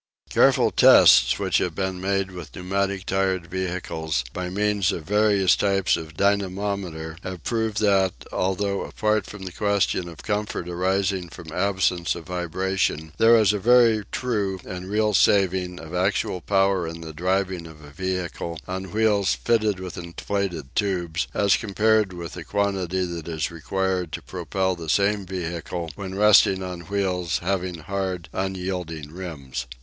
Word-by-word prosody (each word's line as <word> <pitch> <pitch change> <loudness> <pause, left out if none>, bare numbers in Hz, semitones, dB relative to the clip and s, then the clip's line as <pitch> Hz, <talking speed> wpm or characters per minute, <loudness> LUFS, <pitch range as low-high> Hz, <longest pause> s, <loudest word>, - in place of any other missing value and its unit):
Careful - - +4
tests - - +7
which - - +1
have 85 -3 -2
been 95 -1 -2
made 95 0 0
with 90 -2 -9
pneumatic 95 +1 -2
tyred 95 -2 0
vehicles 85 -5 -3
by 90 0 -3
means 100 0 +1
of 80 - -4
various 100 0 +3
types 95 -2 +2
of 80 -1 -8
dynamometer 100 -5 -1
have 95 -4 -7
proved 110 -3 -1
that, 95 -3 +3 0.2
altogether 100 +1 0
apart 110 0 0
from 105 -2 -9
the 95 - -6
question 100 -2 0
of 85 - -11
comfort 105 -4 -2
arising 95 +1 0
from 80 -1 -10
absence 90 -2 0
of 85 -2 -8
vibration, 90 -2 -2
there 115 +1 +7
is 105 -2 +4
a 105 - -1
very 115 -1 +5
true 105 -7 -1
and 90 +1 -7
real 105 +1 +1
saving 95 -2 +2
of 80 +1 -10
actual 90 0 0
power 95 -2 +2
in 85 +1 -7
the 80 -1 -8
driving 95 +1 -1
of 75 -1 -14
a 75 - -12
vehicle 85 -1 -4
on 95 +1 -4
wheels 105 -2 +2
fitted 110 -4 +1
with 95 -1 -6
inflated 85 -3 -4
tubes, 90 -4 -1
as 100 -2 +4
compared 110 -1 +2
with 85 -2 -7
the - - -7
quantity 95 -3 -1
that 85 -2 -6
is 80 -1 -2
required 90 +1 -2
to - - -4
propel 95 -1 -2
the 80 -2 -7
same 100 +2 +2
vehicle 85 -2 -4
when 95 +2 -6
resting 100 -2 +5
on 90 -1 -5
wheels 90 -4 0
having 90 0 -2
hard 90 +1 -4
unyielding 90 -5 -4
rims. 80 -9 -6
95 Hz, 155 wpm, -24 LUFS, 85-100 Hz, 0.2 s, tests